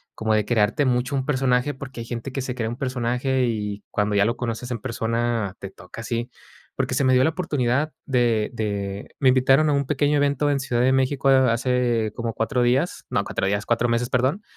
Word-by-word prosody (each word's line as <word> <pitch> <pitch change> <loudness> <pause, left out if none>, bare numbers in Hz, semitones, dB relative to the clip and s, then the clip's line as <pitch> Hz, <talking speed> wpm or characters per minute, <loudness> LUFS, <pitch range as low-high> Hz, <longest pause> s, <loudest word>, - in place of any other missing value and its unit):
como 110 0 0
de 105 -1 +1
crearte 115 +5 +2
mucho 125 +2 0
un 135 -1 -1
personaje, 130 0 +1
porque 130 -2 -9
hay - - -6
gente 120 +3 -5
que 135 - -3
se 125 -1 -4
crea 115 -3 -2
un 120 - -5
personaje 130 0 0
y 105 -3 -3
cuando 105 0 0
ya 100 - +4
lo 115 +2 -1
conoces 120 +1 -4
en 120 - -2
persona, 115 -2 -2
te 95 - -7
toca 90 +2 -13
así. 115 +1 -3 0.5
Porque - - -1
se - - +1
me 130 - +3
dio 130 0 +5
la 160 - +2
oportunidad 150 -4 0
de 120 -5 +1
de 100 -3 -4
me 135 - +3
invitaron 135 +4 +4
a - - +2
un 140 0 +1
pequeño 145 +2 +1
evento 145 0 +1
en 140 -1 +1
Ciudad 125 -3 0
de 130 +1 +3
México 135 +1 +1
a 130 -2 +5
hace 120 -2 0
como 115 -1 -3
4 125 +4 -1
días 130 +8 +1
no, - - +1
4 - - -2
días, 100 +1 -1
4 120 0 +1
meses, 120 +1 0
perdón. 130 - 0
125 Hz, 220 wpm, -23 LUFS, 115-135 Hz, 0.5 s, dio